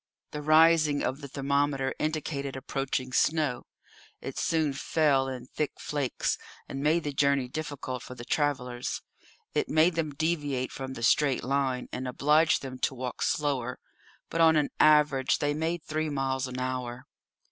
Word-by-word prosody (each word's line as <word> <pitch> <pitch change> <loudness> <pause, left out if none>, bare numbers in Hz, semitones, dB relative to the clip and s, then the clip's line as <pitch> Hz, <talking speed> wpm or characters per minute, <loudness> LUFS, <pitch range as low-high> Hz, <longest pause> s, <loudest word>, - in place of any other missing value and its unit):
The 150 - -5
rising 155 -1 +5
of 135 +3 -2
the 140 - -6
thermometer 140 0 0
indicated 150 -3 -2
approaching 135 -1 -3
snow; 150 -4 +1 0.5
it - - -6
soon 160 -3 +1
fell 140 -1 +2
in 130 -2 -5
thick 150 +3 -3
flakes, 145 -4 -1 0.3
and 135 - -5
made 155 +3 +2
the 145 - -3
journey 140 -2 +2
difficult 135 -3 -5
for 125 - -9
the 120 -1 -9
travellers; 125 -5 -1 0.5
it - - 0
made 160 +3 +4
them 155 -3 -2
deviate 145 -5 -1
from 130 0 -6
the 115 - -6
straight 140 +1 +3
line, 135 -2 0
and 130 - -4
obliged 150 +5 +3
them 130 -1 -7
to 130 - 0
walk 125 -1 -5
slower; 135 -5 0 0.5
but, 165 - +1
on 160 -1 +6
an 150 -2 +2
average, 150 -3 +4
they 145 0 0
made 160 +2 -2
three 155 0 -2
miles 135 -2 -1
an 125 0 -6
hour. 125 0 -3
140 Hz, 160 wpm, -28 LUFS, 130-150 Hz, 0.5 s, on